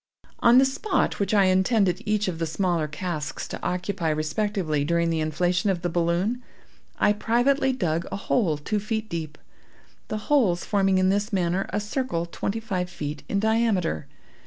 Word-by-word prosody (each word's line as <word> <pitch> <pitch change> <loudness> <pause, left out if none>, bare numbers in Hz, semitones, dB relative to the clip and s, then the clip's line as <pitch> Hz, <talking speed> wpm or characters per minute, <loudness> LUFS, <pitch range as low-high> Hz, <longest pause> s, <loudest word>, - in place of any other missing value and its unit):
"On 235 +1 +6
the 265 - +7
spot 370 +10 0
which 200 - 0
I 205 -2 +5
intended 190 0 +2
each 210 -1 +1
of 170 -3 -3
the 165 - -1
smaller 170 -1 0
casks 155 0 -4
to - - -6
occupy 180 -2 -2
respectively 155 0 -1
during 170 +2 +1
the 165 - 0
inflation 175 +5 0
of 180 -2 -1
the 175 - 0
balloon, 175 +8 0 0.6
I 205 - +4
privately 250 +6 +2
dug 170 -9 -1
a - - -2
hole 195 -5 +1
two 210 +8 -2
feet 220 +1 -3
deep; 155 -3 -5 0.7
the 215 - -3
holes 200 -12 +3
forming 195 -2 +2
in 185 0 +3
this 205 +3 0
manner 185 -1 0
a 205 - -1
circle 210 -5 -2
twenty 195 +5 -3
five 185 -5 -3
feet 145 -3 -5
in 200 - +1
diameter. 220 - +1
185 Hz, 170 wpm, -25 LUFS, 170-215 Hz, 0.7 s, the